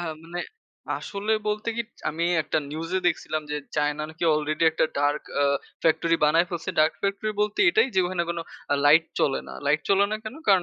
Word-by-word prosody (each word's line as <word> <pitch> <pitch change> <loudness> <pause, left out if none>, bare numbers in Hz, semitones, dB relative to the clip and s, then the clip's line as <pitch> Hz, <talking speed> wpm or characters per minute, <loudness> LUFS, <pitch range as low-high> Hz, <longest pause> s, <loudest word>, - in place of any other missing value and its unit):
হ্যাঁ, 165 -2 -3
মানে 175 +1 -5 0.6
আসলে 205 +2 -3 0.2
বলতে 210 +1 -2
কি 235 - 0 0.3
আমি 165 +2 -2 0.2
একটা 155 - 0
নিউজে 165 +4 -2
দেখছিলাম 155 -2 0
যে 150 - -1 0.2
চায়না 150 0 0
নাকি 160 +2 -4
আলরেডি 155 +2 0
একটা 160 0 +1
ডার্ক 145 +1 +1 0.2
আ - - +4 0.4
ফ্যাক্টরি 165 +1 +3
বানায় 165 +4 +4
ফেলছে। 170 -2 -3
ডার্ক 155 +1 +3
ফ্যাক্টরি 200 +2 -1
বলতে 210 0 0
এটাই 435 -5 +3
যে 190 - +4
ওখানে 180 -1 -1
কোন 170 - -3 0.3
অ্যা 145 - +2
লাইট 160 +3 +7 0.2
চলে 135 - +2
না। - - -8
লাইট 150 +2 +3
চলে 195 0 +5
না 215 - 0
কেন? 215 - -6
কারণ 190 -3 +6
165 Hz, 200 wpm, -25 LUFS, 155-195 Hz, 0.6 s, লাইট